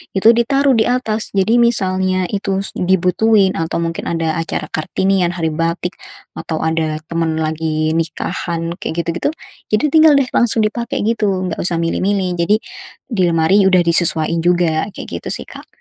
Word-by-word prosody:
itu 220 +4 +6
ditaruh 275 +4 +2
di 220 -1 +2
atas. 225 -3 -1
Jadi, 220 +5 +3
misalnya 185 -5 +1
itu 195 -1 -1 0.2
dibutuhin 190 +2 +2
atau 165 +1 -2
mungkin 165 0 -4
ada 165 0 -1
acara 165 -1 -3
Kartinian, 180 +2 0
Hari 160 -2 -1
Batik, 170 +3 -2 0.4
atau 160 -1 -4
ada 160 -1 -1
teman 165 -1 -1
lagi 155 0 -1
nikahan 165 +1 -3
kayak 170 +1 -3
gitu-gitu, 170 - -1 0.4
jadi 215 +8 +2
tinggal, 315 -1 +6
deh, 265 - 0
langsung 230 -2 +2
dipakai, 235 +1 -3
gitu, 200 -5 0
enggak - - -5
usah 175 -1 -1
milih-milih. 185 +3 0
Jadi, 205 +6 +3 0.5
di 220 -7 -2
lemari 170 +4 +3
udah 185 -2 +4
disesuain 170 -1 +2
juga, 175 0 +1
kayak, - - -9
gitu, - - -10
sih, - - -6
Kak. - - -12
180 Hz, 155 wpm, -17 LUFS, 165-210 Hz, 0.5 s, itu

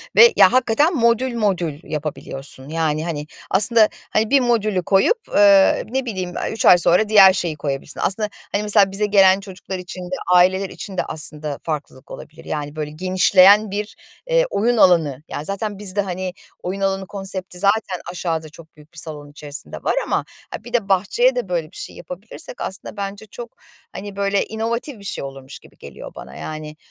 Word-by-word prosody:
ve, 470 0 +8
ya, - - +6
hakikaten 260 +7 +2
modül 235 0 +1
modül 180 -9 -1
yapabiliyorsun. 145 -3 -6
Yani, 160 -1 -1
hani, 150 -3 -4 0.2
aslında, 215 +3 +5 0.2
hani, 215 0 +1
bir 280 +1 +5
modülü 215 -6 0
koyup, 195 - +3 0.2
eee, 200 -1 +5
ne 265 +2 -2
bileyim, 185 -6 -4
aaa, - - -2
3 225 - -3
ay 180 - +8
sonra 180 +4 +3
diğer 195 -3 +8
şeyi 175 -4 -2
koyabilirsin. 140 -2 -5
Aslında, 210 +2 0 0.2
hani, 205 - -1
mesela 205 -2 +4
bize 205 +2 -1
gelen 195 -2 +5
çocuklar 190 -1 -8
için 180 0 -8
de 180 +1 -4 0.2
aileler 190 +2 +3
için 195 -3 -9
de - - +1
aslında 150 -2 -3
farklılık 150 -4 -6
olabilir, 160 +2 -11
yani, 145 -1 -5
böyle 150 -1 -4
genişleyen 185 +4 +4
bir, 205 +1 -4 0.3
eee, - - +3
oyun 235 +3 +1
alanı. 160 -9 +3
Yani, 150 - -6
zaten 200 +2 -3
biz 200 -2 +1
de, 205 - +2
hani, 185 -1 -4 0.3
oyun 190 +2 -4
alanı 195 0 -1
konsepti 190 -2 -6
zaten 200 -1 +1
aşağıda 165 -3 -3
çok 160 +1 -16
büyük 150 +1 -19
bir - - -17
salon 150 -2 -5
içerisinde 145 0 -8
var - - 0
ama, - - -1 0.3
ha, - - -7
bir 240 - -12
de 225 -5 0
bahçeye 205 - +2
de - - -3
böyle - - -2
bir - - -18
şey 410 +1 -8
yapabilirsek - - -10
aslında 190 +2 -6
bence 200 +1 -5
çok, 235 +3 -10 0.4
hani, 200 +1 -8
böyle, 200 0 0
inovatif 230 +3 -4
bir - - -14
şey 200 - -5
olurmuş 135 0 -9
gibi - - -20
geliyor - - -11
bana. - - -10
Yani, 155 0 -7
195 Hz, 185 wpm, -20 LUFS, 160-215 Hz, 0.4 s, ve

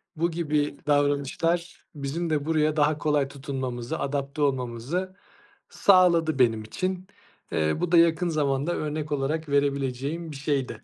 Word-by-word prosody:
bu 170 +2 0
gibi 150 -3 -1
davranışlar 145 +4 0
bizim 150 +4 -3
de 150 -2 0
buraya 155 -1 +1
daha 150 0 +3
kolay 150 -2 +1
tutunmamızı, 130 -4 -4
adapte 140 +1 -3
olmamızı 135 +8 -1 0.5
sağladı 170 -6 +4
benim 115 -3 +3
için. 185 - -3 0.4
Eee, 80 -1 +1
bu 175 -1 -1
da 175 - +6
yakın 170 +1 +4
zamanda 145 +1 0
örnek 150 0 -3
olarak 145 +2 -1
verebileceğim 140 +3 -1
bir - - -8
şeydi. 135 -5 -2
145 Hz, 135 wpm, -26 LUFS, 135-165 Hz, 0.5 s, da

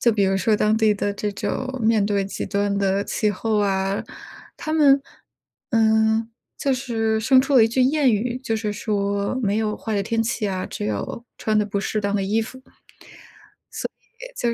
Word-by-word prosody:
就 235 - +4
比 205 - +1
如 195 0 +2
说 210 +4 +2
当 215 +1 +2
地 220 -1 +3
的 205 0 -1
这 205 0 -3
种 260 +5 -3
面 220 -2 +3
对 200 -1 0
极 195 - -5
端 200 -1 0
的 195 0 +1
气 210 - 0
候 215 +2 -1
啊， 195 -1 0 0.5
他 310 - -4
们， 280 -3 +5 0.7
嗯， 220 0 +3 0.3
就 275 - +1
是 225 -4 -1
生 255 +4 +5
出 275 +1 -1
了 225 - +8
一 - - +1
句 255 +3 0
谚 280 +2 +3
语， 240 +3 0
就 225 - 0
是 215 -1 -2
说 200 0 -1
没 205 0 +1
有 215 -1 -1
坏 220 - -4
的 200 - +1
天 225 +2 0
气 225 -1 -2
呀， 190 -2 -2
只 - - -5
有 105 - -4
穿 215 -1 +1
得 210 - +2
不 200 -1 -2
适 215 - -2
当 200 0 -1
的 195 - +1
衣 210 +4 +1
服。 260 +4 -9
所 260 - -27 1.8
以 - - -1
215 Hz, 210 characters per minute, -22 LUFS, 200-230 Hz, 1.8 s, 了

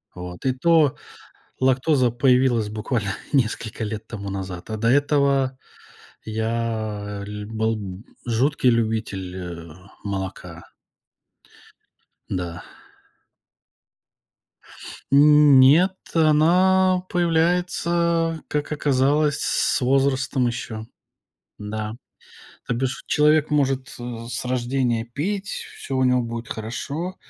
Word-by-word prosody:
Вот, 90 +2 -8
и 130 - +3
то 150 0 +3 0.6
лактоза 130 -1 +2
появилась 125 -3 +2
буквально 105 -1 -2 0.2
несколько 115 -4 -1
лет 110 0 -5
тому 100 -4 -6
назад, 95 -2 -6
а 110 - -3
до 115 +2 +1
этого 140 -1 +2 0.7
я 110 -2 -3
ль 105 0 -6
был 110 -3 -3 0.2
жуткий 125 +3 +2
любитель, 110 -5 -1
э, 85 -3 -8 0.3
молока. 95 -4 -5 1.7
Да. 90 -1 -4 2.5
Нет, 150 +3 +7 0.2
она 180 +4 +4
появляется, 170 -1 +1
как 150 +1 -3
оказалось, 145 +1 +1
с - - +1
возрастом 130 0 +1
ещё. 110 -2 -5 0.7
Да. 110 +1 -5 0.7
То - - 0
бишь 130 +2 -2
человек 150 +1 +3
может, 135 -3 0
э, 120 - -9 0.3
с - - -3
рождения 125 -2 -1
пить, 190 - -4
всё 135 - -5
у 130 - +2
него 125 -1 +3
будет 115 0 -6
хорошо. 145 +11 -5
125 Hz, 95 wpm, -23 LUFS, 110-150 Hz, 2.5 s, Нет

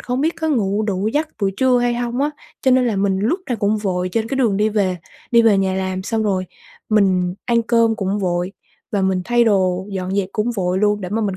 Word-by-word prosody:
không 250 +1 -2
biết 320 +4 +1
có 320 - 0
ngủ 210 -7 +1
đủ 205 -1 -1
giấc 300 +6 -1
buổi 195 - +1
trưa 255 -1 +3
hay 240 0 +1
hông 240 +1 -2
á, 290 +2 +1 0.3
cho 260 - +3
nên 255 0 +4
là 220 -4 0
mình 195 -1 +1
lúc 265 - 0
nào 245 - 0
cũng 205 +1 +1
vội 185 -3 -1
trên 225 0 -1
cái 270 - -2
đường 230 -7 +2
đi 210 +1 +2
về 200 -4 0 0.3
đi 235 -1 +5
về 220 -3 +4
nhà 190 -1 0
làm 185 0 -2
xong 220 +2 -1
rồi 190 -3 0 0.4
mình 185 -4 +2
ăn 235 -1 +2
cơm 230 -1 +2
cũng 195 +1 -1
vội, 180 -1 -1 0.4
và 200 -2 +1
mình 190 -1 +1
thay 240 +2 +3
đồ 190 -3 +1
dọn 190 -1 -3
dẹp 195 -2 0
cũng 220 +3 0
vội 180 0 0
luôn 210 0 +2
để 185 - -5
mà 220 +4 -1
mình 195 -3 -2
210 Hz, 250 wpm, -19 LUFS, 190-235 Hz, 0.4 s, đi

